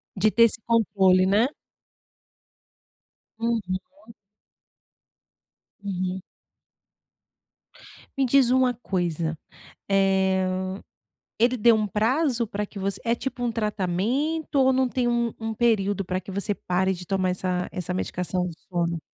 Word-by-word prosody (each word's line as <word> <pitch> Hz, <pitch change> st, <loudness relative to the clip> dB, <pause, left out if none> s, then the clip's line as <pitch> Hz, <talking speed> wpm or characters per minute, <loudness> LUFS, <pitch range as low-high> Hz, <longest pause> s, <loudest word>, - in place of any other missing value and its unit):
De 215 Hz, +2 st, +2 dB
ter 230 Hz, -, +5 dB
esse 230 Hz, 0 st, +3 dB
controle, 190 Hz, -5 st, +4 dB
né? 205 Hz, +6 st, +3 dB, 1.9 s
Uhum. 225 Hz, -5 st, -1 dB, 2.1 s
Uhum. 185 Hz, -1 st, -3 dB, 2.0 s
Me 270 Hz, -, +3 dB
diz 260 Hz, -1 st, +4 dB
uma 255 Hz, -1 st, +3 dB
coisa, 170 Hz, -7 st, -2 dB, 0.5 s
eh, 190 Hz, -1 st, +2 dB, 0.9 s
ele 240 Hz, +3 st, +3 dB
deu 230 Hz, +1 st, +5 dB
um 215 Hz, -1 st, 0 dB
prazo 235 Hz, -, +1 dB
para 205 Hz, 0 st, -3 dB
que 200 Hz, 0 st, -10 dB
você 195 Hz, 0 st, -3 dB
é 230 Hz, -, +1 dB
tipo 245 Hz, 0 st, -4 dB
um 240 Hz, -, 0 dB
tratamento 225 Hz, -, -1 dB
ou 265 Hz, -1 st, +5 dB
não 260 Hz, 0 st, +2 dB
tem 250 Hz, 0 st, -1 dB
um 235 Hz, -1 st, 0 dB
um 225 Hz, 0 st, -4 dB
período 205 Hz, -4 st, +1 dB
para 185 Hz, +1 st, -2 dB
que 190 Hz, +2 st, -9 dB
você 200 Hz, +1 st, -2 dB
pare 190 Hz, +1 st, 0 dB
de 180 Hz, 0 st, -8 dB
tomar 185 Hz, -1 st, 0 dB
essa 180 Hz, -1 st, -2 dB
essa 180 Hz, 0 st, -3 dB
medicação 180 Hz, 0 st, -2 dB
do 170 Hz, -, -6 dB, 0.2 s
sono? 170 Hz, -2 st, -1 dB
205 Hz, 125 wpm, -25 LUFS, 185-235 Hz, 2.1 s, ter